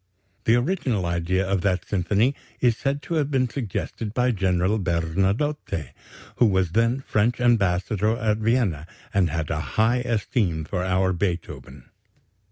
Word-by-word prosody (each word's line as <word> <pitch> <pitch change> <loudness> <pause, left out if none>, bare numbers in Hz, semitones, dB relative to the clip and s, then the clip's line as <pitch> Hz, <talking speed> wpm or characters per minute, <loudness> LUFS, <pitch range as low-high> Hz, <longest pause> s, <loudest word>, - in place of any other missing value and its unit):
The 115 - +5
original 125 - 0
idea 85 +3 0
of 95 -1 0
that 95 -2 0
symphony 100 +7 +1 0.3
is 120 -3 +3
said 140 +3 -2
to - - -5
have 150 -3 +1
been 130 -3 +1
suggested 115 -2 -4
by 125 0 +2
General 95 0 +1
Bernadotte, 95 - -1 0.5
who 120 - +5
was 95 -4 +1
then 115 +6 +2
French 120 -1 0
ambassador 105 -2 +2
at 110 -3 0
Vienna, 105 - 0 0.3
and 95 -4 +3
had 80 -1 -3
a 75 - -1 0.2
high 110 +3 +4
esteem 105 - -1
for 90 +2 -2
our 95 0 +1
Beethoven.... 85 -8 -4
100 Hz, 145 wpm, -24 LUFS, 90-120 Hz, 0.5 s, The